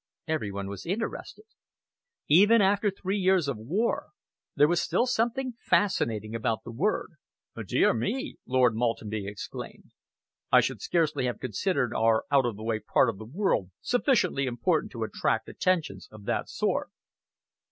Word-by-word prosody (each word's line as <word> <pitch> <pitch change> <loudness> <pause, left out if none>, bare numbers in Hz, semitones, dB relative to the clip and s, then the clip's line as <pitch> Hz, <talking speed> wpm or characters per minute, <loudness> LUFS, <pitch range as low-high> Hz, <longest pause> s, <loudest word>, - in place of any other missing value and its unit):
Every 155 -11 -1
one 100 0 -5
was 100 - -7
interested. 225 - -4 0.8
Even 205 +9 +6
after 205 +1 +3
three 195 +1 -3
years 185 -4 +3
of 130 -6 -3
war, 215 - -1 0.5
there 145 - +5
was 175 +1 +2
still 240 - +1
something 250 +2 0
fascinating 110 - +1
about 115 -1 -1
the 120 - -8
word. 180 - -1 0.6
"Dear - - +3
me!" 255 - -3
Lord 125 -2 +3
Maltenby 110 -3 -2
exclaimed. 100 0 -8 0.6
"I - - +8
should - - -1
scarcely 155 -6 0
have 125 - -2
considered 125 - -1
our 110 0 +2
out 135 -3 +4
of 115 - -3
the 110 - -9
way 110 -1 -1
part 110 +3 +2
of 105 -4 -5
the 110 - -8
world 140 - 0
sufficiently 235 - +1
important 120 -2 0
to - - -3
attract - - -1
attentions 160 - -1
of 105 -2 -13
that - - -1
sort." - - -1
140 Hz, 150 wpm, -28 LUFS, -, 0.8 s, I